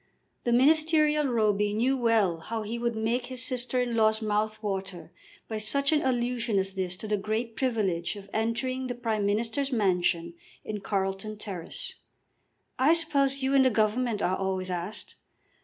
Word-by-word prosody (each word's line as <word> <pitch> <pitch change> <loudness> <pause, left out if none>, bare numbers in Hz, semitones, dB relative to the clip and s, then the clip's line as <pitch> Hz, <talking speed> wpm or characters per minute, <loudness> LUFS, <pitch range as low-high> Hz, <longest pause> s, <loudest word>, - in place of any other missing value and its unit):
The 240 - +1
ministerial 305 +3 +4
Roby 210 -4 +1
knew 250 +5 +2
well 225 -9 +2
how 220 +7 -4
he 230 +3 -4
would 235 -1 -1
make 235 +3 -1
his 255 -1 -3
sister 255 0 -1
in 245 -2 0
law's 220 -1 +3
mouth 215 0 0
water 190 -4 -4 0.4
by 220 -1 -3
such 275 +7 +1
an 305 -1 +3
allusion 240 -3 0
as 195 0 0
this 185 -2 -3
to 215 - -7
the 210 0 +1
great 220 +3 -3
privilege 210 -9 -1
of 200 -1 -10
entering 255 +4 -1
the 245 - -3
Prime 220 -4 -1
Minister's 230 +7 -1
mansion 180 -6 +1 0.3
in 215 -1 -4
Carlton 195 +2 -2
Terrace. 210 - -5 0.9
"I 280 +5 +5
suppose 275 -5 +1
you 265 +1 +1
in 275 - +6
the 260 - +5
Government 220 0 +1
are 185 - +2
always 190 -1 -2
asked." 180 +4 -5
220 Hz, 165 wpm, -28 LUFS, 200-255 Hz, 0.9 s, in